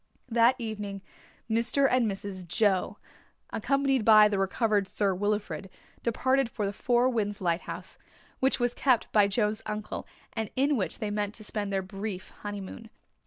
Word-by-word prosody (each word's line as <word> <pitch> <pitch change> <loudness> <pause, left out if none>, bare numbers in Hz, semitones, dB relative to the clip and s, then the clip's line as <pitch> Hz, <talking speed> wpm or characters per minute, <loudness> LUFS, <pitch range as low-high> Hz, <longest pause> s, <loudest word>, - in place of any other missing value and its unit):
That 235 +2 +5
evening 210 -4 -5 0.4
Mr. 235 +5 +2
and 250 -4 +2
Mrs. 195 -2 -6
Joe, 195 +1 +1 0.5
accompanied 275 -3 +1
by 215 -1 +8
the 200 -2 0
recovered 200 +1 +1
Sir 200 -1 +1
Wilfrid, 205 0 -2 0.3
departed 260 +2 +1
for 215 -3 -3
the 200 - -2
Four 245 +3 +2
Winds 210 -5 -1
Lighthouse, 170 -1 -3 0.4
which 265 0 +2
was 245 0 +1
kept 255 -4 +2
by 205 -2 +5
Joe's 210 +1 0
uncle 210 0 -4 0.3
and 220 -2 -3
in 280 +3 +3
which 195 -7 -1
they 215 -3 -3
meant 205 0 -2
to 215 - -7
spend 210 -1 -3
their 195 -1 0
brief 195 0 -6
honeymoon. 205 +2 -7
215 Hz, 155 wpm, -28 LUFS, 200-240 Hz, 0.5 s, by